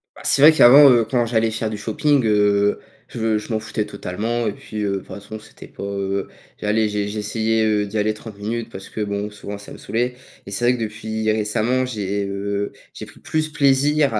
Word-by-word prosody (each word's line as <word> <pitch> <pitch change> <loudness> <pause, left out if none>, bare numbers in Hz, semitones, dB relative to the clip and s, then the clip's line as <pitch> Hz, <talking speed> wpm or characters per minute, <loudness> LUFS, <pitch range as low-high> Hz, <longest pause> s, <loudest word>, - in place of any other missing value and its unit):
Bah, - - -13
c'est 140 - +3
vrai 150 +2 +10
qu'avant, 140 -1 +8
heu, 120 -3 +4
quand 120 -1 +1
j'allais 115 -1 +1
faire 110 0 -2
du 110 - -5
shopping, 130 +7 +1
heu, 105 -1 +3 0.3
je 110 -2 0
je 105 +2 -5
m'en 110 - +1
foutais 110 0 -3
totalement 105 +4 -3
et - - 0
puis, 105 0 -6
heu, 100 -1 0
de - - 0
toute 95 - -10
façon, 105 +2 -8
c'était 105 - -14
pas - - -10
heu. 100 0 -2 0.3
J'allais 105 +1 +1
j'ai 105 -1 -2
j'essayais, 110 +1 -1
heu, 105 -1 +1
d'y 105 +2 -5
aller 105 +1 +1
30 105 -1 -11
minutes 115 +3 -4
parce 95 -2 -9
que, 110 - -5
bon, 100 0 -2
souvent, 105 -1 -8
ça 105 - -12
me - - -9
saoulait. 125 +2 -2 0.3
Et 100 - -9
c'est 100 +5 -1
vrai 125 +1 +4
que - - -6
depuis 110 0 -2
récemment, 110 +4 0
j'ai, 100 -4 -3
heu, 100 +1 -3 0.2
j'ai - - -8
pris - - -16
plus 155 0 -2
plaisir 145 -1 +3
à 105 - +1
110 Hz, 225 wpm, -21 LUFS, 105-120 Hz, 0.3 s, vrai